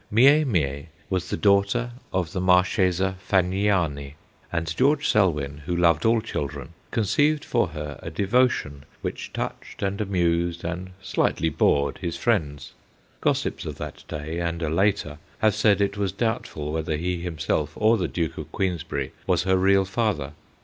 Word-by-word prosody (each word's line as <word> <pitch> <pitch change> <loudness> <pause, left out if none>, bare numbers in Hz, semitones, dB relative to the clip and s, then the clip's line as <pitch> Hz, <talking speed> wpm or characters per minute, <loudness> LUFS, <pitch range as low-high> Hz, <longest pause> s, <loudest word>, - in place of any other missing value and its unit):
Mie 140 +8 +6
Mie 75 - -1 0.2
was 90 -1 -1
the - - -2
daughter 100 +4 +2 0.2
of 90 -3 -1
the 90 - -2
Marchesa 95 0 +3
Fagniani; 90 -7 +1 0.4
and 85 -1 -2
George 145 +3 +3
Selwyn, 75 -9 +1
who 90 - 0
loved 85 -1 +3
all 115 0 +4
children, 70 -6 -4 0.2
con 115 - 0
ceived 150 +8 +2
for 120 -5 +1
her 75 -2 -7
a - - -5
devotion 100 - +1 0.2
which - - -4
touched - - -5
and 100 +1 -1
amused 85 -3 0
and 90 +2 -4
slightly 80 - +1
bored 70 -1 +1
his 85 -3 -3
friends. 75 - -1 0.5
Gos - - +2
sips - - -4
of - - -6
that - - -7
day 80 +3 -4
and 85 0 -2
a 75 - -1
later 85 -4 +1 0.2
have 110 -1 +3
said 105 -1 +3
it 100 0 0
was 100 -2 0
doubtful 100 -8 -2
whether 80 -1 -1
he 90 +3 -1
himself 85 -4 -2
or 110 +2 +4
the 95 -5 -1
Duke 85 -3 -3
of - - -8
Queensberry 85 -7 -2 0.2
was - - +2
her 95 0 +2
real 95 +1 +4
father. 95 - -1
90 Hz, 165 wpm, -25 LUFS, 80-100 Hz, 0.5 s, Mie